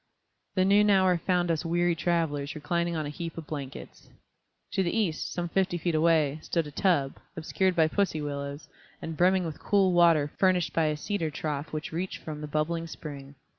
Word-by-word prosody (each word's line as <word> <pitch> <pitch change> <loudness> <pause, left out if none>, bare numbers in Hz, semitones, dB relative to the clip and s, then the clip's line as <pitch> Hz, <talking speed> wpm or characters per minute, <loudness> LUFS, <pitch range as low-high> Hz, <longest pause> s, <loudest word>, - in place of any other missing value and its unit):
The 185 -1 +3
noon 205 +2 +5
hour 190 -2 +4
found 175 -1 +1
us 160 0 -1
weary 175 +1 +1
travelers 165 -4 -1
reclining 170 +3 -1
on 155 -1 -2
a - - -4
heap 165 +1 -6
of 165 - -6
blankets. 140 -3 -8 0.6
To - - +1
the 180 - +1
east, 180 -8 -1
some 175 -1 -2
fifty 185 0 0
feet 170 0 -1
away, 155 -2 +3
stood 165 0 -1
a 150 - -8
tub, 145 -5 +1 0.2
obscured 185 +3 0
by 160 -2 +4
pussy 165 -2 0
willows, 145 0 -5 0.3
and 160 - -5
brimming 185 +2 +3
with 160 -3 -6
cool 195 -3 +2
water 165 -4 +4
furnished 185 -3 +2
by 165 - +2
a 150 -1 0
cedar 165 0 -2
trough 150 0 -4
which 155 0 -4
reached 175 +3 -3
from 150 -1 -6
the 150 - -5
bubbling 165 +3 -1
spring. 140 -3 -9
165 Hz, 190 wpm, -28 LUFS, 150-180 Hz, 0.6 s, noon